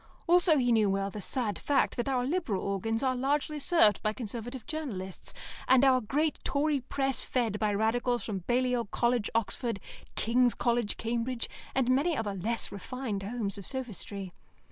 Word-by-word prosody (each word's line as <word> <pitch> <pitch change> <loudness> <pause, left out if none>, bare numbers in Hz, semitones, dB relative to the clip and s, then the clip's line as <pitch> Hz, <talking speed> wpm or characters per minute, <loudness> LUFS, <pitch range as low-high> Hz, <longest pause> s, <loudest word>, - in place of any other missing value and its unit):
Also 350 -2 +5
he 245 -2 +2
knew 215 -3 +4
well 195 0 0
the 210 - -6
sad 215 -4 0
fact 285 - +1
that 240 +2 -1
our 255 -2 +1
Liberal 285 - -1
organs 225 +5 -1
are 260 -1 +2
largely 290 +3 0
served 280 - +4
by 215 - +1
Conservative 235 +1 -6
journalists, 210 - -5 0.4
and 260 0 +6
our 260 -1 +5
great 295 +8 0
Tory 285 +1 +1
press 270 0 0
fed 225 -5 -1
by 215 -1 +1
Radicals 230 +3 +1
from 200 -3 -3
Balliol 245 +4 +1
College, 235 +1 +1
Oxford, 230 0 -1 0.4
King's 245 +1 +3
College, 235 -3 0
Cambridge, 235 +1 -2 0.3
and 260 -2 +2
many 290 +5 +2
other 210 -3 -2
less 220 +5 -2
refined 215 +1 -4
homes 200 -1 -3
of 195 - -9
sophistry. 205 -7 -4
240 Hz, 165 wpm, -30 LUFS, 210-265 Hz, 0.4 s, and